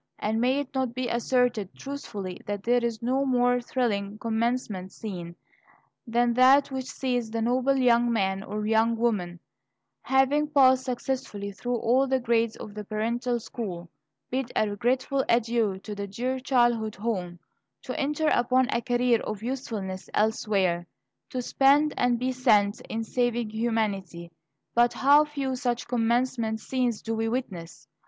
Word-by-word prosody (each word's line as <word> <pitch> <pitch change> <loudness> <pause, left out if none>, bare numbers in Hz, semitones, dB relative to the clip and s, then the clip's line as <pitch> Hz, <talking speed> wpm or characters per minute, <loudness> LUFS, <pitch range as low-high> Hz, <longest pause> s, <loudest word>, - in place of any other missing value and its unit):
And 220 +2 -1
may 260 +3 +2
it 280 - -9
not 260 -3 -1
be 255 -1 -2
asserted 240 -4 0
truthfully 210 -10 -6
that 205 -1 -3
there 245 +1 +2
is 230 -1 -2
no 260 +3 +1
more 245 -2 +2
thrilling 215 -5 -2
commencement 225 -4 -2
scene 175 -6 -7 0.7
than 240 +1 +2
that 265 +3 +5
which 260 -1 -4
sees 245 -4 -2
the 230 +1 -3
noble 255 +4 +1
young 240 -2 +3
man 195 -3 0
or 210 +1 -4
young 225 +1 +2
woman, 195 -7 -1 0.6
having 270 +3 +2
passed 260 -3 +4
successfully 250 -5 -3
through 245 +5 -3
all 245 +4 +2
the 265 0 +1
grades 230 -2 +1
of 210 - -9
the 210 0 -6
parental 235 +4 -1
school, 180 -8 -6 0.4
bid 255 -1 -2
a 215 - +2
regretful 255 +6 0
adieu 230 -4 +2
to 210 - -6
the 200 0 -5
dear 250 +6 -3
childhood 240 -5 +1
home, 190 -5 -3 0.5
to 255 - -5
enter 300 +2 0
upon 255 +1 +2
a 235 - 0
career 245 -1 +2
of 215 0 -5
usefulness 220 -7 -4
elsewhere, 195 -5 +1 0.4
to 250 -1 -3
spend 285 +4 +3
and 245 -1 +2
be 255 +2 -1
spent 210 -5 +2
in 225 0 -2
saving 240 -1 -1
humanity? 205 -7 -2 0.4
But 240 0 +3
how 290 +3 +5
few 280 -3 -3
such 245 -2 -2
commencement 235 -1 0
scenes 245 -1 -1
do 225 - -2
we 225 0 -1
witness! 190 -9 -5
235 Hz, 150 wpm, -27 LUFS, 215-255 Hz, 0.7 s, that